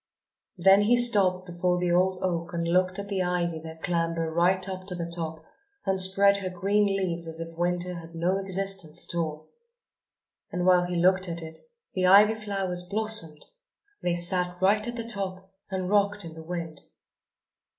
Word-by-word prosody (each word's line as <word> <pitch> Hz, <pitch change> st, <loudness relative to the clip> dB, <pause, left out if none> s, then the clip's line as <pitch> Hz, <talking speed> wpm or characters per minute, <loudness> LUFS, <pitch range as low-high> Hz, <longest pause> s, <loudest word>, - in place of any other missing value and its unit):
Then 195 Hz, +3 st, +5 dB
he 230 Hz, +4 st, +3 dB
stopped 195 Hz, -6 st, +5 dB
before 180 Hz, 0 st, -1 dB
the 180 Hz, -1 st, -1 dB
old 185 Hz, +1 st, +1 dB
oak 175 Hz, -1 st, -2 dB
and 170 Hz, 0 st, -2 dB
looked 185 Hz, +2 st, +1 dB
at 200 Hz, 0 st, -6 dB
the 195 Hz, -2 st, -2 dB
ivy 175 Hz, -2 st, -1 dB
that 160 Hz, 0 st, -11 dB
clambered 165 Hz, -2 st, -1 dB
right 180 Hz, +3 st, +2 dB
up 185 Hz, 0 st, -7 dB
to 180 Hz, -, -4 dB
the 170 Hz, -1 st, -4 dB
top 165 Hz, -2 st, -6 dB, 0.4 s
and 190 Hz, -1 st, +2 dB
spread 200 Hz, +2 st, +5 dB
her 190 Hz, -2 st, -4 dB
green 200 Hz, +3 st, +1 dB
leaves 185 Hz, -4 st, -1 dB
as 160 Hz, 0 st, -4 dB
if 165 Hz, 0 st, -7 dB
Winter 175 Hz, +1 st, -1 dB
had 170 Hz, -1 st, -10 dB
no 180 Hz, +4 st, 0 dB
existence 195 Hz, -4 st, -2 dB
at -, -, -2 dB
all. 155 Hz, -2 st, -4 dB, 1.0 s
And 180 Hz, 0 st, -2 dB
while 180 Hz, -1 st, +4 dB
he 175 Hz, 0 st, -4 dB
looked 185 Hz, +2 st, +3 dB
at 170 Hz, 0 st, -4 dB
it 160 Hz, 0 st, -6 dB, 0.3 s
the 185 Hz, -1 st, +1 dB
ivy 205 Hz, +3 st, +7 dB
flowers 195 Hz, -4 st, -2 dB
blossomed! 205 Hz, -4 st, -1 dB, 0.6 s
They 175 Hz, -1 st, 0 dB
sat 180 Hz, 0 st, 0 dB
right 210 Hz, +4 st, +2 dB
at 240 Hz, -, -5 dB
the 230 Hz, -, -4 dB
top 190 Hz, -3 st, -4 dB, 0.2 s
and 190 Hz, -2 st, -3 dB
rocked 205 Hz, 0 st, +1 dB
in 165 Hz, -, -9 dB
the 160 Hz, -, -10 dB
wind! 165 Hz, -2 st, -6 dB
180 Hz, 180 wpm, -26 LUFS, 170-195 Hz, 1.0 s, ivy